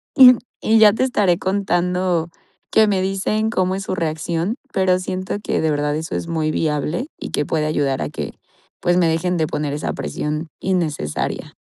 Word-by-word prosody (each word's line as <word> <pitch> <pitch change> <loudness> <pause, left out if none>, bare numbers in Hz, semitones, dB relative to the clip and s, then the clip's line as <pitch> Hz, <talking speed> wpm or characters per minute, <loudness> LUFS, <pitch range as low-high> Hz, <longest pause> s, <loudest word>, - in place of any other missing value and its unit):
y 255 -3 +10 0.3
y 225 - +3
ya 210 -2 +7
te 225 - 0
estaré 205 -9 +2
contando 180 -3 0 0.4
qué 220 -1 +6
me 195 -2 +1
dicen 195 +3 0
cómo 185 -3 +1
es 195 - -4
su 190 - -3
reacción, 165 +4 -2 0.2
pero 185 -1 +3
siento 185 0 -3
que - - 0
de 160 - +1
verdad 145 0 0
eso 160 +1 -4
es - - -3
muy 160 -2 -1
viable 155 - -1
y - - -6
que 145 - 0
puede 155 0 0
ayudar 140 -3 0
a - - -1
que, - - -5 0.5
pues 175 - +2
me 175 -2 +4
dejen 180 +3 0
de 160 - +1
poner 150 -1 -2
esa 150 - -2
presión 150 - -3
innecesaria. 160 - -2
175 Hz, 185 wpm, -20 LUFS, 155-190 Hz, 0.5 s, y